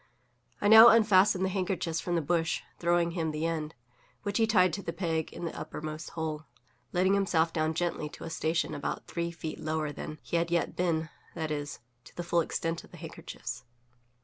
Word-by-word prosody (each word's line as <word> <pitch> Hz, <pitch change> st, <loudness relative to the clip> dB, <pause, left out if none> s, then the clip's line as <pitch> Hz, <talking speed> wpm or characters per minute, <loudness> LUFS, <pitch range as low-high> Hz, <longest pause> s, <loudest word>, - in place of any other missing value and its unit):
I 205 Hz, -, +1 dB
now 220 Hz, +2 st, +11 dB
unfastened 205 Hz, -4 st, +5 dB
the -, -, 0 dB
handkerchiefs 180 Hz, -3 st, -1 dB
from 175 Hz, -, -2 dB
the 165 Hz, -, +1 dB
bush, 165 Hz, +1 st, 0 dB, 0.2 s
throwing 170 Hz, 0 st, +2 dB
him 165 Hz, -2 st, -1 dB
the 155 Hz, +1 st, -2 dB
end, 160 Hz, -2 st, -2 dB, 0.5 s
which 205 Hz, +1 st, -1 dB
he 225 Hz, -, +4 dB
tied 185 Hz, -5 st, +4 dB
to 200 Hz, -, -3 dB
the 165 Hz, -, -4 dB
peg 165 Hz, -2 st, -2 dB
in -, -, -6 dB
the 165 Hz, -, -4 dB
uppermost 155 Hz, +1 st, -6 dB
hole, 155 Hz, -1 st, -3 dB, 0.5 s
letting 185 Hz, +2 st, +3 dB
himself 170 Hz, -5 st, +2 dB
down 155 Hz, 0 st, 0 dB
gently 165 Hz, -3 st, -1 dB
to -, -, -11 dB
a 165 Hz, -, -6 dB
station 160 Hz, 0 st, 0 dB
about 145 Hz, -, -4 dB
three 170 Hz, 0 st, -3 dB
feet 165 Hz, -2 st, -6 dB
lower 155 Hz, -1 st, -2 dB
than 155 Hz, +1 st, -7 dB
he 170 Hz, -, -1 dB
had 170 Hz, 0 st, 0 dB
yet 170 Hz, 0 st, 0 dB
been 165 Hz, -2 st, 0 dB, 0.3 s
that 160 Hz, -2 st, -3 dB
is, 145 Hz, -3 st, -4 dB, 0.2 s
to -, -, -16 dB
the 175 Hz, -, -4 dB
full 170 Hz, 0 st, +2 dB
extent 165 Hz, +1 st, -2 dB
of -, -, -16 dB
the -, -, -13 dB
handkerchiefs. -, -, -7 dB
170 Hz, 200 wpm, -30 LUFS, 160-180 Hz, 0.5 s, now